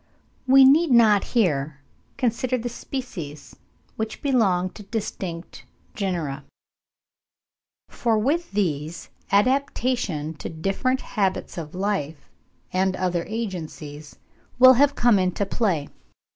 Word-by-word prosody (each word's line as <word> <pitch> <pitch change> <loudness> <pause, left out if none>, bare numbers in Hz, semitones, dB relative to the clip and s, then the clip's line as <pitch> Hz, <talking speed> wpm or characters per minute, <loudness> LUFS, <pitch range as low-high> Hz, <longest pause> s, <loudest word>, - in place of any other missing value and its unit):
We 265 +1 +8
need 305 +5 +5
not 225 -5 +5
here 150 -8 +1 0.4
consider 255 0 0
the 245 0 -4
species 205 - -7 0.4
which 220 0 -4
belong 195 -10 +2
to 210 - -12
distinct 190 -5 -6 0.3
genera; 165 -9 -3 1.4
for 230 -2 0
with 300 +10 0
these, 165 -5 -2 0.2
adaptation 235 - +1
to - - -6
different 195 +11 -1
habits 195 -4 -2
of 165 -1 -7
life, 180 -7 -3 0.4
and 185 0 +1
other 180 -2 -1
agencies, 160 -9 -6 0.4
will 255 +1 +9
have 280 +3 +3
come 240 -4 +4
into 185 +2 0
play. 190 -9 -1
200 Hz, 105 wpm, -24 LUFS, 170-245 Hz, 1.4 s, will